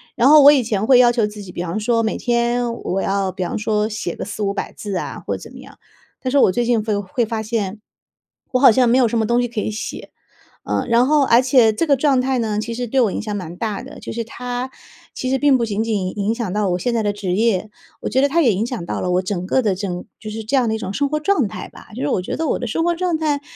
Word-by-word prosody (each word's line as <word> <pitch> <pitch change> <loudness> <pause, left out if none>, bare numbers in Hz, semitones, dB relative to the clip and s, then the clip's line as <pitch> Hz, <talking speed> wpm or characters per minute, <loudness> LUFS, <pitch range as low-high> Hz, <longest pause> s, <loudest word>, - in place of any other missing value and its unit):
然 245 +4 +4
后 300 -2 +8
我 290 - +10
以 280 - +4
前 215 -3 -1
会 250 0 +6
要 240 -1 +6
求 235 -3 +1
自 210 0 -7
己， 185 -2 -9
比 175 - -4
方 180 +5 -3
说 230 +1 +1
每 220 - -1
天 240 0 0
我 195 -4 -3
要 195 -1 0
比 185 0 -4
方 175 - -3
说 215 0 0
写 210 -5 -4
个 - - -5
400-500 205 0 -3
百 - - -4
字 200 -3 -4
啊， - - -5
或 - - -2
者 - - -9
怎 - - -11
么 - - -12
样， - - -15 0.4
但 255 - -2
是 280 - +1
我 190 - +5
最 240 +5 0
近 230 -3 +1
会 210 -2 -1
会 205 +5 -1
发 220 0 -3
现， 215 -2 -3 0.7
我 255 - +2
好 260 -3 +7
像 250 +1 +3
没 250 +3 +4
有 250 - +4
什 230 - -2
么 220 - +2
东 235 +2 +2
西 245 - 0
可 230 -2 -4
以 - - -2
写。 215 - -6 0.6
呃， - - -1
然 235 +2 +4
后 295 -1 +4
而 240 0 +5
且 250 -4 +4
这 330 - 0
个 285 - +4
状 270 -1 +2
态 260 0 0
呢， 215 -2 -1
其 225 +2 -3
实 245 +1 -3
对 265 +4 -1
我 225 -6 +3
影 - - -3
响 210 -1 -4
蛮 175 -3 -6
大 210 0 -3
的， - - -11
就 - - -7
是 230 0 -3
它， 245 +2 -5 0.4
其 255 - -4
实 265 - +2
并 280 -2 +4
不 230 - 0
仅 215 +1 -1
仅 205 -3 -2
影 205 +3 0
响 230 -5 -3
到 205 -3 0
我 180 - 0
现 240 +5 -1
在 225 - +1
的 205 -1 0
职 195 -3 -3
业， 215 -2 +1 0.3
我 - - -3
觉 265 - +1
得 280 - +2
它 335 - +3
也 235 - +3
影 205 - -1
响 235 -9 -5
到 - - -3
了 180 - -1
我 180 +1 +2
整 185 -1 -3
个 260 - +2
的 205 -5 +1
整 180 -2 -5
就 215 - -8
是 220 +1 -5
这 245 +6 0
样 250 -3 +3
的 220 - 0
一 - - -2
种 190 -3 -5
生 285 - +1
活 305 0 -1
状 305 - +2
态 - - -7
吧。 - - -15
就 - - -5
让 145 - 0
我 180 - -1
觉 - - -4
得 320 - -2
我 - - 0
的 245 - -4
生 330 +9 -1
活 345 0 +1
状 345 -2 -1
态， 295 -3 -1
225 Hz, 320 characters per minute, -20 LUFS, 205-255 Hz, 0.7 s, 我